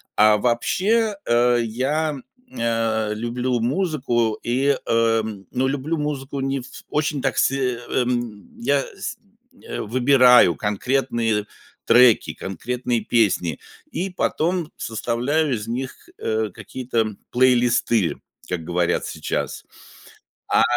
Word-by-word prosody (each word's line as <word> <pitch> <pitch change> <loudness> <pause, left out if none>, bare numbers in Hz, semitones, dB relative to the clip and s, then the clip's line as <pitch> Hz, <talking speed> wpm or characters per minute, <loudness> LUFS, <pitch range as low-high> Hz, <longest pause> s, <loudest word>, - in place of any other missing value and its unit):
А 105 0 +6
вообще, 200 - +1
э, 120 +1 +3
я, 135 +8 -1
м, 135 -3 -8 0.3
э, 115 -2 0
люблю 120 +2 -1
музыку, 125 - 0
и, 135 +4 +2
э, 115 -1 +2 0.3
ну 130 +1 0
люблю 145 +4 -2
музыку 140 -2 -3
не 135 0 -1
в - - -11 0.2
очень 150 -2 -1
так - - -1
се 130 -3 +1 0.8
Я 140 -13 +1 0.2
сь - - -5 0.6
выбираю 125 -4 +5
конкретные 115 0 0 0.4
треки, 120 -1 +5
конкретные 120 +5 -3
песни, 95 - +1 0.3
и 190 +3 -2
потом 175 -1 -1
составляю 125 +6 -1
из 105 0 -6
них, 130 - -5
э, 110 -1 -1
какие-то 115 -5 -3 0.2
плейлисты, 120 -5 +3 0.3
как 90 -3 -3
говорят 85 +1 0
сейчас. - - -4 0.8
А, - - +4
125 Hz, 105 wpm, -22 LUFS, 115-135 Hz, 0.8 s, А